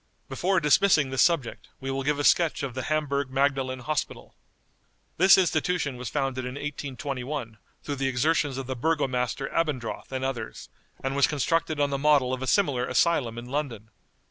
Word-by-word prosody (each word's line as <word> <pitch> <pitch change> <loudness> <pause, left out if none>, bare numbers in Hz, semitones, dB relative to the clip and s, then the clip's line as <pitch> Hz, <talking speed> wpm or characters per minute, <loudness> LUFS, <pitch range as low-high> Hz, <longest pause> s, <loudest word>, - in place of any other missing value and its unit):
Before 180 +8 +1
dismissing 150 -2 +3
this 135 - +1
subject, 165 -9 +1
we 135 0 -4
will 135 0 -2
give 145 +2 0
a 145 - -1
sketch 165 -1 +3
of 135 -3 -3
the 130 - -3
HAMBURG 140 -3 -1
MAGDALEN 135 -1 0
HOSPITAL. 155 +5 -4 0.8
This 190 +3 +7
institution 170 -4 +1
was 125 -1 -6
founded 135 -3 -2
in 125 +1 -5
1821 135 -4 -5 0.2
through 145 - -3
the 135 0 0
exertions 135 +1 +1
of 135 - -4
the 130 +1 -4
Burgomaster 135 -2 -1
Abendroth 140 -10 -2
and 130 0 -2
others, 120 -5 -5 0.3
and 135 +1 -2
was 140 - +4
constructed 155 +1 0
on 145 -1 +1
the 140 - -1
model 140 -3 +3
of 130 - -3
a 130 - -3
similar 135 -11 +2
asylum 125 -4 +1
in 120 - -6
London. 125 -6 -4
135 Hz, 170 wpm, -26 LUFS, 130-150 Hz, 0.8 s, This